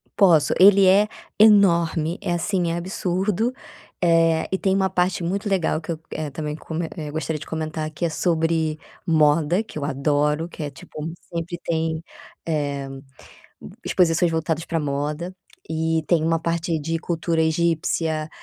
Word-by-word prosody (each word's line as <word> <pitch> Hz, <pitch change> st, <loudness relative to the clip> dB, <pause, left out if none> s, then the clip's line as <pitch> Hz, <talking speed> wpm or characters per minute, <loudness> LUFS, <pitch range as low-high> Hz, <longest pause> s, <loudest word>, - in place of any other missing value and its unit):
Posso, 165 Hz, -7 st, +5 dB
ele 195 Hz, 0 st, +7 dB
é 200 Hz, +3 st, +5 dB, 0.3 s
enorme, 170 Hz, -6 st, +4 dB
é 180 Hz, -4 st, -1 dB
assim, 175 Hz, -1 st, 0 dB
é 170 Hz, -, -2 dB
absurdo, 190 Hz, +5 st, -1 dB, 0.5 s
eh, 165 Hz, -1 st, +3 dB
e 190 Hz, -, +1 dB
tem 190 Hz, -1 st, +1 dB
uma 190 Hz, -1 st, +2 dB
parte 180 Hz, -1 st, 0 dB
muito 200 Hz, +4 st, -2 dB
legal 170 Hz, -4 st, +1 dB
que 170 Hz, -, -5 dB
eu, 160 Hz, -, -4 dB
eh, 155 Hz, -2 st, -3 dB
também 150 Hz, +1 st, -4 dB
come 160 Hz, +1 st, -4 dB
eh, 155 Hz, -3 st, -5 dB
gostaria 160 Hz, 0 st, -3 dB
de -, -, -10 dB
comentar, 155 Hz, -1 st, -3 dB
que 155 Hz, +3 st, -3 dB
é -, -, +1 dB
sobre 160 Hz, -1 st, 0 dB, 0.3 s
moda, 160 Hz, +4 st, +3 dB
que 155 Hz, -, -8 dB
eu -, -, -4 dB
adoro, 150 Hz, +2 st, 0 dB
que 170 Hz, -, -10 dB
é 145 Hz, -, -3 dB
tipo 150 Hz, +3 st, -8 dB, 0.2 s
sempre 170 Hz, +1 st, -3 dB
tem, 160 Hz, -1 st, -1 dB, 0.4 s
eh, 145 Hz, -3 st, -2 dB, 1.0 s
exposições 170 Hz, -1 st, +2 dB
voltadas 160 Hz, 0 st, -1 dB
pra 165 Hz, -, -1 dB
moda, 150 Hz, +5 st, -3 dB, 0.4 s
e 160 Hz, 0 st, 0 dB
tem 170 Hz, -3 st, +2 dB
uma 165 Hz, +1 st, +2 dB
parte 165 Hz, 0 st, -1 dB
de 165 Hz, +2 st, -2 dB
cultura 165 Hz, -1 st, -1 dB
egípcia, 160 Hz, -1 st, 0 dB
165 Hz, 155 wpm, -23 LUFS, 155-175 Hz, 1.0 s, ele